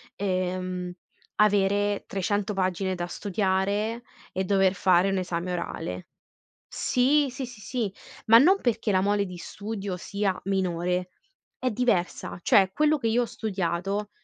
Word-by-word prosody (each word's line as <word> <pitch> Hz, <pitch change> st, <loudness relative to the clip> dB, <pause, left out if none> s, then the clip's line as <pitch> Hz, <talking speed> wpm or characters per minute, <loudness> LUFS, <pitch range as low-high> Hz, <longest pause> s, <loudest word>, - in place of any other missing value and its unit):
ehm, 185 Hz, -1 st, -2 dB, 0.4 s
avere 205 Hz, 0 st, +2 dB
300 205 Hz, +2 st, -1 dB
pagine 185 Hz, 0 st, -1 dB
da 175 Hz, -1 st, -3 dB
studiare, 200 Hz, +4 st, -1 dB, 0.3 s
e 190 Hz, +1 st, -2 dB
dover 195 Hz, -1 st, +3 dB
fare 185 Hz, 0 st, +3 dB
un 195 Hz, -, 0 dB
esame 180 Hz, -1 st, -2 dB
orale. 90 Hz, -, -4 dB, 0.6 s
Sì, 280 Hz, +4 st, +2 dB
sì, 260 Hz, +2 st, -5 dB
sì, 240 Hz, -3 st, -12 dB
sì, 220 Hz, -2 st, -3 dB, 0.3 s
ma 225 Hz, +1 st, +9 dB
non 370 Hz, +10 st, +5 dB
perché 225 Hz, -3 st, 0 dB
la 185 Hz, -, +3 dB
mole 200 Hz, +1 st, +2 dB
di 180 Hz, -1 st, -8 dB
studio 200 Hz, 0 st, -5 dB
sia 195 Hz, +1 st, -2 dB
minore. 180 Hz, -1 st, -1 dB, 0.5 s
È 255 Hz, -, 0 dB
diversa. 215 Hz, -8 st, -1 dB
Cioè, 190 Hz, +1 st, +5 dB
quello 305 Hz, +6 st, +3 dB
che 230 Hz, -4 st, -1 dB
io 235 Hz, +2 st, +2 dB
ho -, -, +1 dB
studiato, 200 Hz, -1 st, -2 dB
195 Hz, 140 wpm, -26 LUFS, 185-215 Hz, 0.6 s, ma